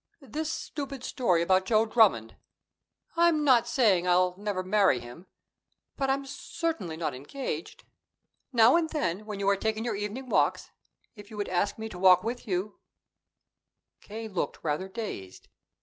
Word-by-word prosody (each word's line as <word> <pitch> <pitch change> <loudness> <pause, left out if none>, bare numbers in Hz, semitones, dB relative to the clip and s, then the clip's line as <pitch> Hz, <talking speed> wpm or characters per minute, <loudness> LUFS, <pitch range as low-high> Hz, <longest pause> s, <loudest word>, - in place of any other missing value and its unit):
"This 310 +3 -4
stupid 275 -5 -6
story 180 -12 +1
about 185 +2 +2
Joe 220 -1 +3
Drummond 210 - +3 0.8
I'm 335 -2 +3
not 245 -5 +4
saying 215 -8 +3
I'll 180 0 +3
never 200 -1 -3
marry 190 -8 +3
him, 120 +10 -12 0.7
but 270 -1 -1
I'm 275 +1 0
certainly 280 - -4
not 155 -4 -2
engaged. 145 - -6 0.7
Now 235 +1 +6
and 325 -2 0
then, 210 - -2
when 210 -2 -5
you 200 - -1
are 200 - +4
taking 220 +3 -2
your 230 -3 -1
evening 210 +6 -5
walks, - - +1 0.4
if 205 -1 -13
you 215 - -10
would 205 - -3
ask 185 +3 0
me 220 0 -5
to 185 -5 -9
walk 185 -1 +6
with 240 +2 -4
you 195 +2 -3 0.6
" - - -58
K. 220 +2 -7
looked 190 -5 -4
rather 155 +5 -1
dazed. 190 - -7
210 Hz, 160 wpm, -28 LUFS, 185-250 Hz, 0.8 s, Now